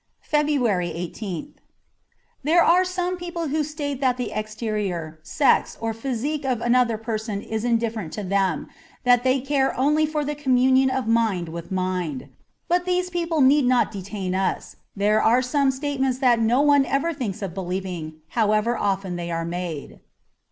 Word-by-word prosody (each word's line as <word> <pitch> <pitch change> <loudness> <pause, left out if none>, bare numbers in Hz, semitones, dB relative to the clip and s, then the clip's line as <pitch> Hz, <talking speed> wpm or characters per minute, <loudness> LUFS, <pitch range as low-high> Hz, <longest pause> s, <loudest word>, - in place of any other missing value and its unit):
'' - - -31
S3 295 0 +3
FEBRUARY 225 -12 +1 0.2
i8th 185 -7 -5 0.9
THERE 335 +4 +4
are 360 +2 +5
some 365 0 -2
people 345 -3 -4
who 305 +2 0
state 290 -2 -4
that 255 -2 +2
the 250 - -3
exterior, 210 -7 -3
sex, 280 - +2
or 225 0 -2
physique 270 +5 -3
of 255 -4 0
another 240 -1 +2
person 220 -2 -3
is 220 0 -3
indifferent 230 -7 -1
to 210 - -4
them, 190 -4 0 0.4
that 245 -1 +4
they 260 +1 +3
care 270 0 0
only 300 +4 +3
for 300 -1 -2
the 295 - -2
communion 265 -2 +3
of 260 0 -1
mind 220 -7 +1
with 170 +2 -8
mind; 180 -7 -2 0.4
but 355 +1 +1
these 360 0 0
people 335 -3 0
need 275 +1 +5
not 250 -3 +3
detain 195 -2 -4
us. 190 0 -2 0.2
There 210 +2 +2
are 245 +3 +4
some 275 +1 +2
state 275 +1 -2
ments 260 -2 +1
that 250 -3 +3
no 230 +4 +3
one 285 -1 +5
ever 305 +5 0
thinks 220 - -4
of 185 -4 -4
believing, 180 -4 -5
however 215 +1 +1
often 195 -4 -1
they 170 0 -4
are 165 0 -2
made. 170 -3 -5
240 Hz, 170 wpm, -23 LUFS, 195-285 Hz, 0.9 s, are